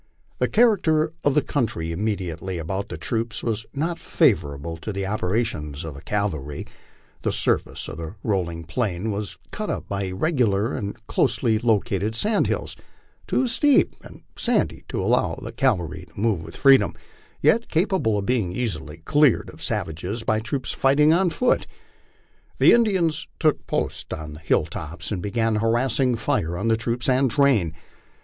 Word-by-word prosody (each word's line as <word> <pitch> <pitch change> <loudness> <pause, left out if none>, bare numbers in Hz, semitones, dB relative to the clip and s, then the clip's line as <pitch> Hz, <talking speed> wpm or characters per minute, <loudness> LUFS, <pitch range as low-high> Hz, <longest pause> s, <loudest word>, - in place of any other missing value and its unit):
The - - +2
character 170 -9 +3
of 145 -1 +2
the 150 - +4
country 110 - -1
immediately 95 -2 -3
about 95 +6 -3
the - - -5
troops 115 0 -3
was 110 -1 -2
not 165 +4 -2
favorable 70 +3 +1
to 95 +7 -5
the 100 -1 -3
operations 90 -7 -2
of 75 -1 -8
cavalry; 75 -9 -2 0.6
the - - 0
surface - - 0
of - - -7
the 80 +4 -6
rolling 85 -6 -1
plain 100 +3 -2
was 100 0 -4
cut - - -4
up - - -3
by 100 -1 -2
irregular 105 - +1
and 100 0 -4
closely 110 -2 +1
located 105 -2 +1
sand 210 - +2
hills, - - -2 0.5
too 260 - +1
steep 290 +4 +3
and - - -14
sandy - - 0
to - - -3
allow - - +2 0.2
cavalry 100 - 0
to - - -11
move 110 -4 +1
v/ith 80 - -9
freedom, 135 -1 +5 0.4
yet 230 +1 +3
capable 165 - +1
of 100 - -2
being 115 -7 +1
easily 80 -8 -4
cleared 145 -4 +3
of - - -15
savages 90 +9 -3
by 110 -1 +1
troops 130 +4 -3
fighting 150 +3 +4
on 180 +1 +3
foot. 245 +9 +1 0.9
The - - +6
Indians 190 -9 +2
took 155 -2 +1
post - - -2
on 75 -1 -7
the 75 - -10
hill 80 - +2
tops 80 +6 -6
and 95 -4 -2
began 110 +2 0
a - - +1
harassing 120 +3 +2
fire 85 -6 -1
on 115 +5 -1
the 115 - +4
troops 115 +1 -2
and 130 0 +3
train. 115 - +2
110 Hz, 160 wpm, -24 LUFS, 90-135 Hz, 0.9 s, The